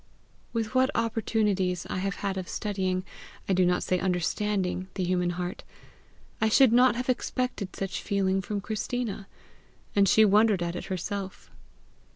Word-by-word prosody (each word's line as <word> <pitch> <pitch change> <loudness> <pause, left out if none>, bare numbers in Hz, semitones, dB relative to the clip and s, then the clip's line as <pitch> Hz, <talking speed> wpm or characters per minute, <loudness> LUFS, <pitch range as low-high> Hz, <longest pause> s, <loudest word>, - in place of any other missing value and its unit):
With 225 -1 -2
what 260 0 +4
opportunities 210 -5 0
I - - -3
have 195 +1 -2
had 195 -1 0
of 185 -1 -5
studying, 190 -3 -2 0.4
I 195 - +2
do 185 -1 +3
not 180 0 +1
say 185 - 0
UNDERSTANDING, 185 +1 -1
the 190 - -1
human 180 0 +1
heart, 175 0 -4 0.8
I 220 - +3
should 255 +1 +5
not 250 -1 +5
have 250 +1 -3
expected 250 -5 -2
such 195 -1 -3
feeling 195 -1 0
from 205 +1 -3
Christina 215 -1 -3 0.7
and 200 -2 +5
she 220 - +6
wondered 205 -2 +4
at 170 0 -3
it - - -5
herself. 190 +1 -5
195 Hz, 155 wpm, -27 LUFS, 185-220 Hz, 0.8 s, she